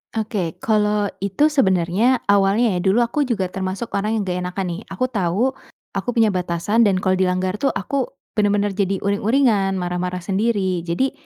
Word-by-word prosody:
Oke 205 -7 -3
kalau 210 -1 +1 0.2
itu 200 +10 +2
sebenarnya 185 -3 +2 0.2
awalnya 200 +2 +3
ya 180 - 0
dulu 195 +4 +3
aku 240 +5 +1
juga 220 -8 -1
termasuk 190 +4 -4
orang 215 +3 0
yang - - 0
gak 180 0 -1
enakan 180 +1 -3
nih. 175 +4 -4
Aku 225 +7 -1
tahu 220 +3 0 0.4
aku 195 - -3
punya 230 -2 +3
batasan 185 +3 +1
dan 195 -4 +3
kalau 185 -1 +1
dilanggar 185 0 0
tuh 275 +6 0
aku 275 -3 -2 0.2
benar-benar 205 -1 +1
jadi 195 -1 0
uring-uringan, 205 0 +2
marah-marah 180 0 -2
sendiri 195 -3 0
jadi, 260 +11 0
200 Hz, 165 wpm, -21 LUFS, 185-220 Hz, 0.4 s, awalnya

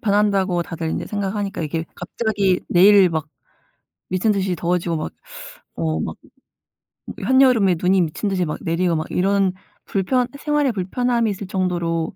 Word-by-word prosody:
변한다고 200 -4 +2
다들 165 -1 -5
인제 - - -3
생각하니까 205 -2 -3
이게 160 +1 -3
갑자기 200 0 -1
내일 195 +1 +6
막 160 -2 -3 0.8
미친 185 +4 +1
듯이 190 -3 0
더워지고 175 0 -1
막 155 - -4 0.7
어 80 -1 -1
막 - - -4 1.1
한여름에 250 -6 +4
눈이 185 +1 +3
미친 170 +6 -2
듯이 185 -2 0
막 150 - -4
내리고 170 +1 0
막 155 0 -2
이런 195 0 +1 0.3
불편 245 +6 0
생활에 295 -2 +1
불편함이 230 +3 0
있을 200 0 -6
정도로 175 -3 -1
190 Hz, 310 characters per minute, -21 LUFS, 170-205 Hz, 1.1 s, 내일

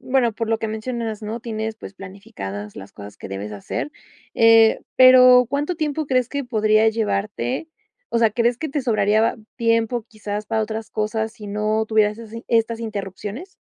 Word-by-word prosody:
bueno, 255 -3 +1
por 225 +1 -4
lo 225 - +2
que 225 - -3
mencionas, 220 0 -4
¿no?, 220 +2 -5
tienes 220 -1 -4
pues 200 - -10
planificadas 190 - -8
las 95 - -10
cosas 100 0 -11
que - - -8
debes 100 +2 -6
hacer, 105 - -5 0.4
eh, 225 -1 +6 0.2
pero, 255 -1 +8
¿cuánto 290 +5 -1
tiempo 310 -1 -2
crees 255 -2 +1
que 280 -1 -3
podría 215 -2 +3
llevarte? 205 - -2 0.4
O - - 0
sea, 225 -2 +4
¿crees 235 +2 +1
que 315 +3 -5
te 290 +1 -1
sobraría 215 -2 +2 0.2
tiempo, 230 0 +1
quizás 210 -1 -5
para 220 -1 0
otras 220 0 -5
cosas 220 +1 -2
sí 215 -3 -11
no 215 +2 0
tuvieras 215 -1 +2
esas 230 0 -9
estas 230 0 +1
interrupciones? 210 - -6
220 Hz, 170 wpm, -21 LUFS, 210-235 Hz, 0.4 s, pero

